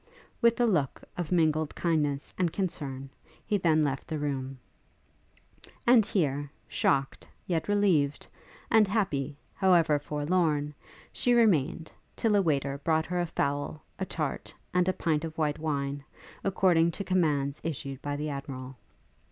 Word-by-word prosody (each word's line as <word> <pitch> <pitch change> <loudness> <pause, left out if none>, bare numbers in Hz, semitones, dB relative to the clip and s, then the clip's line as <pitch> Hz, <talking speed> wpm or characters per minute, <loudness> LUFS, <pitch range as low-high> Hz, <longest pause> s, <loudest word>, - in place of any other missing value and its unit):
With 235 0 +4
a 240 - +4
look 160 - 0
of 175 -2 -4
mingled 155 -3 +2
kindness 150 -4 0
and 180 -3 0
concern, 135 -8 -4 0.3
he 210 - 0
then 160 -3 +3
left 140 -2 -2
the 155 - -3
room. 135 -2 -3 1.3
And 240 -2 +7
here, 145 -6 0 0.2
shocked, 135 -1 0 0.2
yet 165 -3 -1
relieved, 185 -9 +2 0.5
and 220 -2 +6
happy, 155 - -1 0.2
however 170 -6 +4
forlorn, 150 0 0 0.4
she 245 -1 +2
remained, 165 - +2 0.2
till 220 -2 +2
a 200 - +5
waiter 140 -5 0
brought 160 +2 +1
her 180 +1 -2
a 175 - 0
fowl, 145 0 -2 0.2
a 190 - -1
tart, 155 -3 -3 0.2
and 180 0 +3
a - - +2
pint 155 -4 0
of 160 -1 -6
white 150 -2 0
wine, 140 -2 -2 0.4
according 180 -4 +3
to 200 - -4
commands 150 -7 +1
issued 140 -4 -4
by 145 0 -3
the 150 +1 -3
Admiral. 135 -2 -6
155 Hz, 145 wpm, -29 LUFS, 140-180 Hz, 1.3 s, And